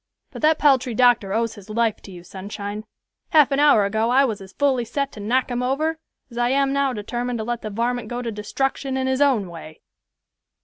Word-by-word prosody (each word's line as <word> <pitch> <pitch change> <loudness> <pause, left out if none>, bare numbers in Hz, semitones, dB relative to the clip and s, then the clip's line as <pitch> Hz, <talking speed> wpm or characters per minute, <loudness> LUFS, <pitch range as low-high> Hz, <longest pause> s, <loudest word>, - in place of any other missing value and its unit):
But - - -9
that 310 0 +4
paltry 260 -5 +3
doctor 240 -5 +3
owes 230 +2 0
his 205 -2 -14
life 225 0 0
to 195 - -12
you, 175 -2 -11
Sunshine. 200 +3 -7 0.4
Half 300 -3 +5
an 275 - +1
hour 290 -9 +5
ago 220 +3 0
I 270 +3 +4
was 220 -6 -3
as 190 -1 -11
fully 270 -4 +1
set 275 +4 -3
to - - -11
knock 245 +5 0
him 245 0 -1
over 310 +6 -1 0.3
as 235 - -6
I 240 0 +2
am 275 +1 +2
now 280 -1 +1
determined 240 +2 -3
to 220 - -3
let 240 0 -3
the 215 - -5
varmint 235 +2 -2
go 245 +2 -4
to 230 - -3
destruction 265 +5 -2
in 260 - -1
his 260 +1 0
own 255 -9 +3
way." 160 -2 -11
240 Hz, 220 wpm, -22 LUFS, 210-270 Hz, 0.4 s, Half